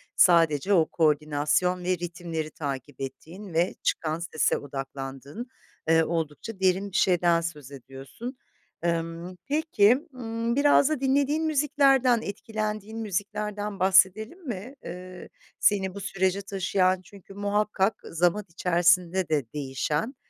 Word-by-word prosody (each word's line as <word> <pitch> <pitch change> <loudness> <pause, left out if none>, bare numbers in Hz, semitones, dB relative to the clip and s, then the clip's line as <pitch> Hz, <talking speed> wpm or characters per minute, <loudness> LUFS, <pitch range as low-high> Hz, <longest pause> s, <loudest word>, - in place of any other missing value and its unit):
sadece 165 0 +4
o 165 -4 +5
koordinasyon 155 +3 +1
ve 180 0 +1
ritimleri 170 -2 -5
takip 140 -2 -6
ettiğin 170 +7 -8
ve 170 +3 +1
çıkan 160 0 0
sese 160 -3 0
odaklandığın, 135 - -7 0.4
eee, 165 0 +5
oldukça 165 +6 -4
derin 190 +1 +1
bir - - -10
şeyden 175 -2 +3
söz 150 -5 -6
ediyorsun. 135 - -9 0.5
Imm, 170 +1 -2
peki, 285 -2 +3
ımm, 230 -1 -3
biraz 285 0 +5
da 310 - -1
dinlediğin 285 +3 +2
müziklerden, 275 -5 +3
etkilendiğin 215 +1 -4
müziklerden 210 0 -3
bahsedelim 195 - +3
mi? 235 +5 -6
Eee, 180 +1 -9 0.3
seni 190 -2 +2
bu - - -5
sürece 190 0 0
taşıyan 185 -1 +1
çünkü 195 0 -15
muhakkak 205 0 0
zaman 175 +5 0
içerisinde 175 +1 +2
de 145 -5 +1
değişen, 150 - -2
185 Hz, 120 wpm, -26 LUFS, 165-215 Hz, 0.5 s, o